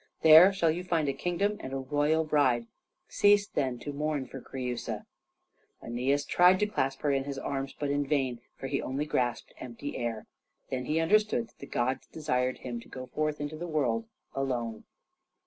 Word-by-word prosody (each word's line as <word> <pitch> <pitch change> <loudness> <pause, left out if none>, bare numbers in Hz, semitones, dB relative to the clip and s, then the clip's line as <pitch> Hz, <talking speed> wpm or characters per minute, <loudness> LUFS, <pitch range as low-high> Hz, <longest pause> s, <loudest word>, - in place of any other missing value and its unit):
There 160 +4 +9
shall 170 -5 +2
you 175 +3 -3
find 165 -4 0
a 140 - +1
kingdom 180 +8 -1
and 130 - -7
a - - -1
royal 145 +4 +1
bride. 135 -6 +2 0.4
Cease 205 0 +4
then 130 -4 -1
to 145 - -5
mourn 150 -1 -1
for 135 +1 -9
Creusa." 125 -2 -4 0.8
Æneas 135 +5 0
tried 180 +1 +6
to 210 - +2
clasp 135 -10 -1
her 145 - +1
in 135 -1 0
his 140 -1 -4
arms, 135 0 -3
but 145 -1 -1
in 145 0 0
vain, 130 -5 0 0.2
for - - -7
he 135 +1 -1
only 135 +3 -2
grasped 125 -5 -1
the - - -19
empty 125 +3 -6
air. 115 -2 -3 0.5
Then 125 -1 -2
he 155 +4 +1
understood 215 +6 +2
that - - -30
the 140 - -9
gods 130 +2 -1
desired 130 -5 -1
him 120 -2 -5
to - - -15
go 130 -1 -7
forth 155 +3 -2
into 145 +1 -4
the 175 +2 -5
world 120 -8 0 0.3
alone. 120 -5 -3
140 Hz, 190 wpm, -29 LUFS, 130-155 Hz, 0.8 s, There